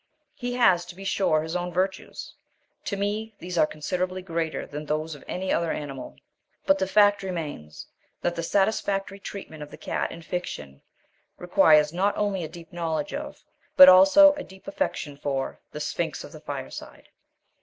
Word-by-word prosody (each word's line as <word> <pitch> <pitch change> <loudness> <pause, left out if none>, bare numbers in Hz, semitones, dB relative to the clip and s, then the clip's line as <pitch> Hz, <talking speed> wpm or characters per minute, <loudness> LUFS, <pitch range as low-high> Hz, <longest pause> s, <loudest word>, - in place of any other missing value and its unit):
He 245 -1 -4
has, 190 -8 +4
to 175 - -11
be 195 - -10
sure, 160 -5 +1
his 160 +2 -5
own 180 0 -2
virtues. 185 +2 -3 0.5
To 200 - -2
me 210 +2 -2
these 180 +1 -6
are 155 -2 +4
considerably 185 +4 -3
greater 165 -3 -3
than 150 +1 -7
those 155 +2 -2
of 145 - -12
any 185 +1 -2
other 170 -1 0
animal. 135 - -6 0.5
But 195 0 +4
the 190 - 0
fact 205 0 +4
remains 155 - -6 0.3
that 175 - -1
the 170 - -2
satisfactory 195 +1 0
treatment 190 -6 -8
of 150 - -7
the - - -11
cat - - -3
in 165 - -9
fiction 115 - -5 0.6
requires 155 -3 +4
not 195 +4 +1
only 200 -3 0
a - - -4
deep 165 0 -13
knowledge 160 -3 -2
of 290 +1 -6 0.3
but 275 - +12
also 195 +11 +8
a 290 -1 -6
deep 190 +5 -16
affection 290 - -3
for 135 -2 -3
the - - -6
sphinx - - -3
of - - -11
the - - -12
fireside. 65 - -8
180 Hz, 175 wpm, -26 LUFS, 155-195 Hz, 0.6 s, but